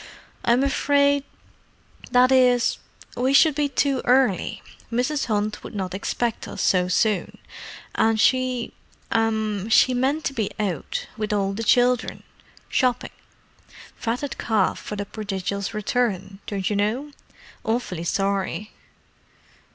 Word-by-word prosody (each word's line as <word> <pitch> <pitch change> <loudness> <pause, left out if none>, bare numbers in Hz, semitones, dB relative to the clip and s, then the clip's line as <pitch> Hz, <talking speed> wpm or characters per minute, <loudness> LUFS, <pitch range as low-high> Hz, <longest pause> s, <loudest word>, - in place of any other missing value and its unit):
"I'm 240 +3 +3 1.5
afraid—that 250 0 +4
is, 250 -2 +4 0.4
we 260 +2 +1
should 310 +2 +6
be 290 0 0
too 275 -1 +1
early. 250 -6 +2 0.3
Mrs. 255 +5 0
Hunt 210 -1 -1
would - - -9
not 190 -2 -3
expect 225 +4 -2
us - - -4
so 180 -1 +3
soon, 195 +2 0 0.6
and 225 0 +2
she—er—she 255 +1 +1 1.2
meant 270 +5 0
to 275 - -1
be 220 -6 -1
out, 185 -9 -2
with 215 -1 -2
all 195 -1 0
the 225 +3 -4
children. 245 +1 +2 0.4
Shopping. 250 -2 0 0.8
Fatted 245 +4 -3
calf 215 -4 +1
for 210 - -6
the 205 0 -4
prodigal's 200 -1 -4
return, 215 -3 -1
don't 195 -3 -2
you 210 - 0
know. 225 +9 -1 0.5
Awfully 220 -7 -2
sorry." 195 +3 -1
225 Hz, 115 wpm, -23 LUFS, 200-255 Hz, 1.5 s, should